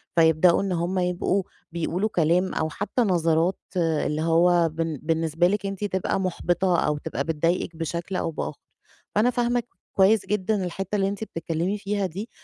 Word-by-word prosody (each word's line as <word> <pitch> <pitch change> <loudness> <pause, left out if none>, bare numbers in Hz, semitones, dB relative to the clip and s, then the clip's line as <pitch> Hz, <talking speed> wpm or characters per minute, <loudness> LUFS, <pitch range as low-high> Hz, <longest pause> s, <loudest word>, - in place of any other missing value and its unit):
فيبدأوا 165 +1 +5
إن 195 -1 -2
هم 175 +2 0
يبقوا 180 +2 0 0.3
بيقولوا 170 +5 -1
كلام 175 0 +2
أو 160 - -1
حتى 205 +8 -2
نظرات 170 -3 +2 0.2
اللي 155 -2 0
هو 170 +1 +4
بن 160 -2 -3
بالنسبة 165 +1 +1
لِك 200 +1 -1
أنتِ 195 +1 -4
تبقى 190 -1 -1
محبطة 180 -1 +1
أو 150 0 0
تبقى 140 -2 -3
بتضايقِك 165 +2 -1
بشكل 170 +3 -4
أو 165 - -1
بآخر. 160 - -5 0.6
فأنا 215 +4 +4
فاهمة 245 -1 0 0.3
كويس 200 +2 +4
جدًا 210 -1 0
الحتة 190 +3 -4
اللي 195 -1 +2
أنتِ 200 +2 -3
بتتكلمي 170 +1 -2
فيها 200 -1 -2
دي. 195 +6 -5
180 Hz, 160 wpm, -25 LUFS, 165-195 Hz, 0.6 s, فيبدأوا